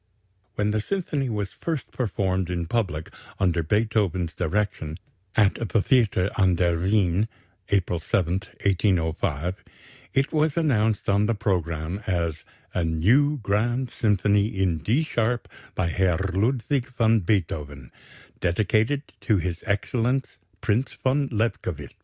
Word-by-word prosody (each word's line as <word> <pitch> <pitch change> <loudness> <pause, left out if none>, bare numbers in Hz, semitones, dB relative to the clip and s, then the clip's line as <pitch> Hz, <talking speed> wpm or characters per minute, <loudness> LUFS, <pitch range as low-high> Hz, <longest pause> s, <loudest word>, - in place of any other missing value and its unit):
When 105 0 +1
the 110 0 0
symphony 150 - -2
was 105 -3 -2
first 160 -5 -4
performed 95 -6 -1
in 85 -1 -2
public 90 -6 -2 0.3
under 90 -3 +2
Beethoven's 100 -2 0
direction, 90 -3 -2 0.4
at 105 +1 +2
the 115 - +3
Theater 100 -5 +2
an 95 -2 +4
der 85 -1 +2
Wien, 95 +1 +2 0.4
April 90 -3 +1
7, 85 +2 0 0.3
1805, 85 -4 0 0.5
it 135 +1 +2
was 155 -1 +2
announced 110 -10 +1
on 100 +1 +3
the 115 - +1
programme 90 -3 -1
as 85 -4 -1 0.3
"A 90 - 0
new 115 - +3
grand 120 +5 0
Symphony 105 -2 +2
in 95 -7 0
D 115 - +1
sharp 120 -5 -1 0.3
by 85 -2 0
Herr 90 -1 +2 0.2
Ludwig 120 +5 +1
van 115 -1 +4
Beethoven, 75 - -2 0.5
dedicated 110 +9 +1 0.2
to 110 -4 +2
his 90 -1 -3
excellence 120 +6 0 0.2
Prince 115 +6 0
von 140 +2 0
Lobkowitz." 100 - -2
100 Hz, 125 wpm, -25 LUFS, 85-115 Hz, 0.5 s, an